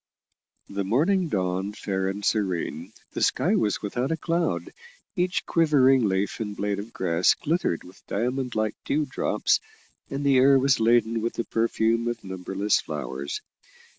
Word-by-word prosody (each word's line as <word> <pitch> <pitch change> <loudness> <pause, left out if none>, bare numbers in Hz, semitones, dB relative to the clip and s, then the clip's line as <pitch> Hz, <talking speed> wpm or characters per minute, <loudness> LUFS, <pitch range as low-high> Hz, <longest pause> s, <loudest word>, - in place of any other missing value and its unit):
The 100 0 -3
morning 165 - +2
dawned 95 0 -1
fair 95 -2 -2
and 100 +1 -4
serene, 90 -4 -1 0.2
the - - -5
sky - - +2
was 105 -1 +1
without 120 +7 -2
a 165 - 0
cloud, 170 +1 -1 0.4
each 180 -1 0
quivering 135 -6 +4
leaf 95 +1 -1
and 105 -2 -4
blade 100 0 -1
of 105 +3 -7
grass 85 -3 +2
glittered 155 - -1
with 90 +1 -17
diamond 125 +3 -2
like 110 -1 0
dew 150 +1 0
drops, 130 - +1 0.5
and 140 +1 -3
the 135 -2 +5
air 135 +1 +6
was 135 0 +3
laden 115 0 +3
with 115 +1 -2
the 115 - -3
perfume 115 0 +1
of 120 - -3
numberless 95 +2 -1
flowers. 70 +1 -5
110 Hz, 155 wpm, -25 LUFS, 100-135 Hz, 0.5 s, air